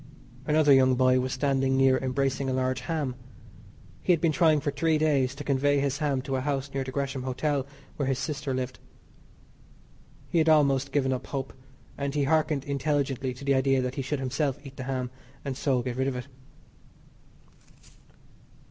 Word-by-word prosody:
Another 150 -1 +5
young 130 -1 +5
boy 130 0 +4
was 130 0 -2
standing 135 -1 +1
near 135 -1 +4
embracing 135 +1 -1
a - - 0
large 130 0 0
ham. 155 -6 -2 0.9
He - - +2
had 170 - +4
been 165 0 +2
trying 155 0 +4
for 145 0 -2
three 155 +3 +1
days 140 -4 +1
to - - -7
convey 140 +1 +2
his 140 0 -1
ham 140 -4 0
to 135 -1 -2
a - - -2
house 140 0 -2
near 135 -1 -1
the 130 - -7
Gresham 135 0 -3
Hotel 130 +2 -1 0.3
where 140 - -1
his 135 -1 +1
sister 150 -1 -3
lived. 130 0 -3 1.5
He 170 - +1
had 160 0 +3
almost 140 -3 +3
given 135 -2 +1
up 130 - -5
hope, 135 -1 -4 0.5
and 140 0 -2
he 145 - +2
hearkened 155 -1 +1
intelligently 140 -2 -1
to 140 - -10
the 140 - +3
idea 135 0 +3
that 125 0 -2
he 135 - -3
should 135 +2 -2
himself 135 +1 -1
eat 135 0 -10
the 130 - -6
ham 130 -2 -3 0.3
and 135 -2 -3
so 130 -2 0
get 125 0 -4
rid 130 0 +1
of 135 - -1
it. 125 - -5
135 Hz, 185 wpm, -27 LUFS, 130-145 Hz, 1.5 s, Another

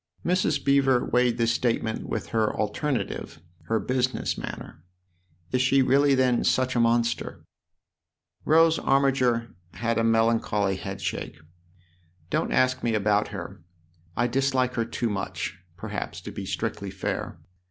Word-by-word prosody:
Mrs. 170 -5 +1
Beever 135 -2 +3
weighed 125 -1 +2
this 115 -1 +2
statement 115 -2 -1
with - - -3
her 110 -2 +1
alternative, 130 +6 -2 0.3
her 110 0 +1
business 130 +4 -1
manner. 80 - -8 0.3
" 90 -1 -37
Is 125 - +2
she 135 +1 +4
really 140 +2 +4
then 130 -2 +2
such 130 0 +1
a - - +2
monster? 115 0 0 0.5
" - - -49
Rose 165 0 +5
Armiger 130 -4 +2 0.2
had 115 0 -1
a - - +2
melancholy 115 -3 +2
headshake. 95 -5 -5 0.5
" 85 -1 -36
Don't - - 0
ask 130 0 +2
me 115 -2 0
about 105 0 +2
her - - -8 0.6
I - - +2
dislike 130 0 +1
her 115 -1 0
too 115 0 -2
much, 95 -3 -4 0.2
perhaps, - - -5
to - - -8
be - - -6
strictly 100 - -3
fair. 95 0 -4
120 Hz, 140 wpm, -26 LUFS, 105-130 Hz, 0.6 s, Rose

